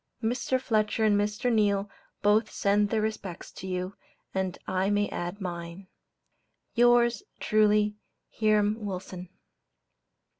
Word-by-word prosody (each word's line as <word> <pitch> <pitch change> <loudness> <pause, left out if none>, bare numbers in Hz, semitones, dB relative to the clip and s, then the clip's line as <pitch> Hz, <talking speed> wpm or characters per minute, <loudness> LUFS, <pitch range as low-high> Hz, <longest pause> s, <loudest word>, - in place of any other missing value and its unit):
Mr. 250 +3 0
Fletcher 220 -3 0
and 215 -1 +4
Mr. 210 +4 0
Neale 205 -2 +2 0.4
both 215 +2 +4
send 205 +1 +2
their 215 0 0
respects 200 -5 -5
to 190 - -8
you, 185 +1 -3 0.4
and 190 -2 -2
I 190 +1 0
may 205 0 +2
add 175 +3 -4
mine. 175 0 -6 0.8
Yours 240 +1 +4 0.2
truly, 210 -1 +3 0.3
HIRAM 215 0 +2
WILSON. 185 -2 -6
205 Hz, 115 wpm, -28 LUFS, 190-215 Hz, 0.8 s, and